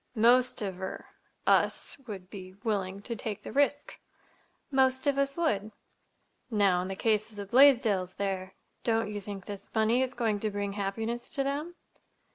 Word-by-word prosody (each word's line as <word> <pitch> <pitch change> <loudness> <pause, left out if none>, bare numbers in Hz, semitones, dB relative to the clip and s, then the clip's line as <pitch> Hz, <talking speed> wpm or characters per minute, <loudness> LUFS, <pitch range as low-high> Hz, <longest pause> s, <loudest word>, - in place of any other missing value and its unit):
"Most 240 +1 +4
of—er—us 190 +7 -2
would 190 -4 -8
be 185 -2 -9
willing 200 -3 -2
to 235 - -3
take 210 -1 -5
the - - -7
risk." 285 +1 0 0.7
"Most 260 0 +3
of 280 -1 +2
us 275 +1 0
would." 215 -11 0 0.8
"Now, 200 -5 +3
in 185 - -4
the 195 - -4
case 215 +1 +1
of 220 - -16
the 205 -1 -5
Blaisdells 225 -6 +4
here—don't 200 +3 -2
you 205 -1 -4
think 195 -2 -7
this 200 -1 -8
money 220 +3 +3
is 260 0 -1
going 220 -4 0
to 215 - +1
bring 200 -1 -3
happiness 220 +4 -3
to 275 - +1
them?" 295 +5 -3
215 Hz, 155 wpm, -29 LUFS, 195-255 Hz, 0.8 s, Most